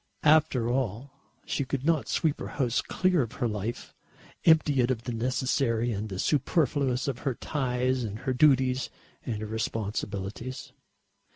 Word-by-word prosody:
After 150 -6 +4
all 125 +1 -2 0.3
she 140 - -1
could 135 0 -3
not 165 -3 +2
sweep 155 -3 0
her - - -5
house 125 -4 +1
clear 185 -4 +1
of 120 0 -4
her 120 - -1
life, 105 +2 -4 0.5
empty 155 -5 +5
it 120 - +1
of 120 -3 -1
the 125 - -4
necessary 120 0 0
and 105 0 -3
the 95 - -5
superfluous 140 - +1
of 130 -3 -2
her 135 -4 -2
ties 130 -3 -1
and 105 -2 -4
her 130 - -1
duties 130 -1 +3 0.3
and 110 -4 -3
her 110 - -4
responsibilities. 110 +1 -4
125 Hz, 155 wpm, -28 LUFS, 115-140 Hz, 0.5 s, empty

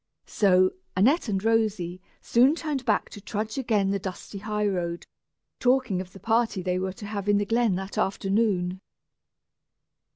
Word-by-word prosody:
So, 185 -2 +3 0.3
Annette 255 - +3
and 195 -1 -1
Rosy 210 -6 0 0.2
soon 255 +6 +4
turned 295 -6 -3
back 215 - +1
to 205 - -10
trudge 215 +5 -3
again 210 -6 +1
the 200 - 0
dusty 190 +1 -7
high 210 +1 -2
road, 175 -4 -2 0.5
talking 250 -7 +2
of 185 -1 -10
the 195 - -13
party 225 -1 +1
they 180 0 0
were 190 0 -2
to 210 +1 -10
have 205 -1 -4
in 205 - +5
the 205 - 0
glen 225 -2 +2
that 190 +2 -4
afternoon. 195 -2 0
205 Hz, 160 wpm, -26 LUFS, 190-225 Hz, 0.5 s, in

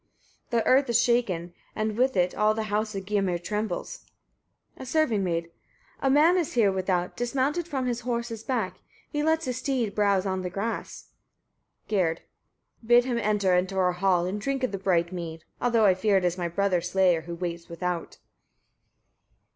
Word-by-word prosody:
The 235 -2 +1
earth 265 0 +4
is 235 -1 +4
shaken, 200 -9 +1 0.2
and 215 0 -1
with 255 0 +1
it 180 0 +2
all 215 0 +2
the 220 - -1
house 215 0 -1
of 195 -1 -5
Gymir 195 -3 0
trembles. 210 - -4 0.7
A - - -9
serving 260 -7 +1
maid. 170 -2 0
15. 165 0 -22 0.5
A 270 - +2
man 310 +6 +5
is 340 -4 -1
here 220 -5 +4
without, 185 -1 -1
dismounted 275 +7 -1
from 270 -5 -2
his 240 -1 -1
horse's 235 -2 -3
back: 220 -8 -2 0.3
he 295 - -1
lets 320 +1 +1
his 250 -1 -2
steed 255 -5 -1
browse 200 -2 +2
on 190 -1 -1
the 180 - -3
grass. 200 +5 -5 0.8
Gerd. 180 -6 0 0.6
16. 225 - -18
Bid 240 +1 +6
him 245 -2 -1
enter 205 -4 +1
into 185 +2 +1
our 180 -1 +3
hall, 180 -1 +2
and 200 +3 -3
drink 270 +2 -2
of 255 - 0
the 195 - -4
bright 175 -3 +1
mead; 165 -3 -6 0.2
although 235 -3 +3
I 190 - +6
fear 195 +2 +2
it 185 - 0
is 175 -1 +1
my 175 -2 -2
brother's 180 0 0
slayer 180 -3 +3
who 170 +1 -7
waits 170 -1 -5
without. 175 0 -4
205 Hz, 185 wpm, -26 LUFS, 180-240 Hz, 0.8 s, Bid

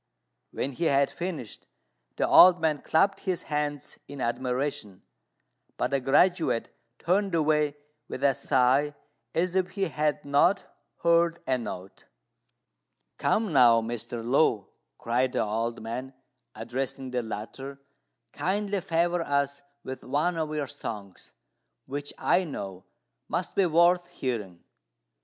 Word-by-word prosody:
When 135 - -3
he 165 +6 -3
had 140 -2 +3
finished, 170 - -6 0.5
the - - +1
old 180 -1 +8
man 155 -3 0
clapped 195 +5 +2
his 185 -3 -2
hands 145 -2 -3
in 140 0 -9
admiration; 125 -3 -2 0.7
but - - -1
the 140 - +2
graduate 145 0 +2 0.2
turned 190 +1 +1
away 150 -2 +2 0.3
with - - -6
a 140 -1 +5
sigh, 135 +4 +2 0.4
as 180 +2 0
if 185 -1 +1
he 195 -3 -1
had 150 -1 -1
not 145 +8 +3 0.4
heard 170 0 +3
a 130 -1 +1
note. 95 -5 -8 1.1
"Come 215 -6 +1
now, 120 -4 +6
Mr. 115 0 -5
Lu," 125 - +3 0.3
cried 125 +2 0
the - - +1
old 115 +2 -2
man, 125 +4 -5 0.4
addressing 130 +3 -4
the 125 -1 0
latter, 120 +5 -7 0.5
"kindly 200 +1 -1
favour 170 +1 +1
us 140 -2 -1 0.2
with 130 0 -7
one 150 +7 0
of 160 -2 -2
your 150 -1 -1
songs, 110 -8 -8 0.5
which, 145 +2 -4
I 185 - +2
know, 95 - -7 0.4
must - - -2
be 195 -2 +3
worth 175 +2 +3
hearing." 105 -9 -4
140 Hz, 130 wpm, -27 LUFS, 125-170 Hz, 1.1 s, old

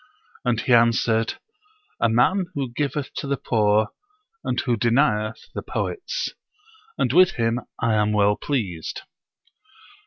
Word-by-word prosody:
"] - - -29
and 120 -2 +1
he 125 - +2
answered, 115 -1 +3 0.6
"A 120 - +3
man 170 - +2
who 135 -4 -3
giveth 145 +1 -2
to - - -3
the 140 0 0
poor, 105 -3 +2 0.5
and - - -1
who 125 -3 +1
denieth 115 0 +1
the - - -4
poets; 445 +5 -3 0.7
and 125 - +1
with 180 +2 +6
him 115 0 0 0.2
I 115 -1 +1
am 105 0 +2
well 105 -1 +3
pleased." 100 - -3
120 Hz, 135 wpm, -23 LUFS, 110-140 Hz, 0.7 s, with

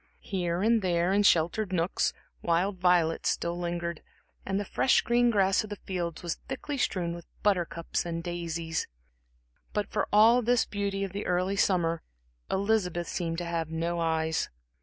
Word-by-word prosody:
Here 180 -2 -1
and 225 0 +4
there, 175 0 +1
in 205 - +4
sheltered 190 +2 +3
nooks, 175 0 +1 0.3
wild 180 +3 +1
violets 175 -2 +3
still 170 0 -1
lingered, 170 -1 -3 0.5
and 195 0 0
the 205 - -3
fresh 255 - +3
green 240 0 +3
grass 195 -3 +3
in 215 - -8
the 205 - -4
fields 175 -4 -4
was 170 -2 -3
thickly 275 +2 -4
strewn 175 -7 0
with 170 -1 -9 0.2
buttercups 175 -4 0
and 170 -1 -4
daisies. 170 -2 -3 0.9
But 210 -1 -2
for - - 0
all 225 +4 +6
this 245 +1 +2
beauty 200 -1 -2
of 195 - -3
the 200 +2 -4
early 180 +2 +1
summer 170 -4 +2 0.5
Elizabeth 190 -4 0
seemed 165 -2 -2
to 175 - -3
have 165 -2 -2
no 165 +1 -2
eyes. 160 -1 0
180 Hz, 160 wpm, -29 LUFS, 170-200 Hz, 0.9 s, all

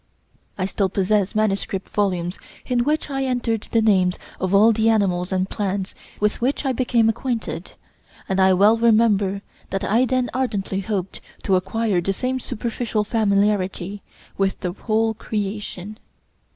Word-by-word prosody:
I 185 - 0
still 195 0 0
possess 195 +1 +1
manuscript 195 -2 0
volumes 180 -3 -1 0.3
in 245 -2 +1
which 300 +2 -1
I 270 0 -1
entered 235 -4 -1
the 225 -1 +3
names 185 -4 +3 0.2
of 185 0 -1
all 210 +3 +6
the 220 +1 +2
animals 190 -5 +1
and 185 0 0
plants 195 -1 -3 0.3
with 210 +2 0
which 270 +4 0
I 270 - +2
became 235 -2 +2
acquainted, 235 +1 -3 0.5
and 190 0 0
I 190 0 +6
well 210 +4 +5
remember 210 -4 +3 0.3
that 195 - -2
I 235 +5 +3
then 255 -1 0
ardently 205 -7 -1
hoped 195 -1 -3 0.2
to 195 - +2
acquire 190 +1 0
the 195 +3 -1
same 255 +5 -2
superficial 235 -3 -2
familiarity 200 -3 0 0.4
with 195 0 0
the 180 -3 -2
whole 220 +2 0
creation. 210 -1 -5
210 Hz, 150 wpm, -22 LUFS, 195-230 Hz, 0.5 s, all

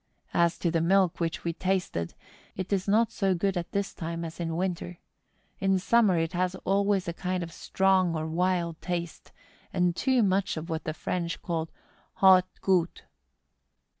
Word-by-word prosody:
As 170 0 +2
to 170 - 0
the 165 -1 +1
milk 185 +1 +3
which 165 -1 -2
we 170 - -1
tasted, 180 - -2 0.4
it 190 +2 -3
is 190 -1 0
not 220 +3 +3
so 195 -2 +1
good 195 +2 0
at 175 -1 -3
this 200 0 -2
time 165 0 -4
as 165 +1 -8
in 165 -1 -2
winter. 175 -1 -3 0.6
In 195 0 +2
summer 200 -1 +3
it 165 0 -1
has 180 +1 0
always 195 -1 +2
a 170 - -2
kind 180 +1 -2
of 165 0 -8
strong 190 -3 +2
or 155 0 -2
wild 170 0 0
taste, 170 -2 -4 0.4
and 180 -2 +1
too 260 0 +2
much 195 -2 +1
of 165 +2 -5
what 160 0 -3
the 155 - -3
French 170 -2 -3
call 165 -2 -2 0.5
haut 185 -1 +6
gout. 180 -3 +1
180 Hz, 170 wpm, -28 LUFS, 170-190 Hz, 0.6 s, haut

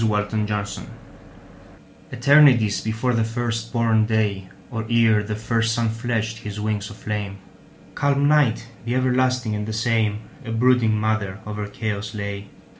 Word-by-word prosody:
Mother 105 -1 0
Night 105 -2 -2 1.3
ETERNITIES 125 -4 +5
before 110 +3 -1
the 115 -1 +2
first 115 0 -3
born 115 -2 +2
day, 105 -4 0 0.2
Or 115 -2 -3
ere 115 -2 +4
the 105 +1 -4
first 115 +1 0
sun 115 -2 +1
fledged 110 -1 -2
his 105 -2 -6
wings 105 -1 -2
of 105 - -10
flame, 105 -2 -4 0.6
Calm 140 0 +2
Night, 140 -7 +3 0.2
the 120 +2 -2
everlasting 125 -2 +1
and 105 0 -3
the 110 - -3
same,A 110 0 -2
brooding 115 -2 +3
mother 110 -3 -1
over 105 -1 -4
chaos 105 0 -4
lay. 100 -1 -5
110 Hz, 140 wpm, -22 LUFS, 105-115 Hz, 1.3 s, ETERNITIES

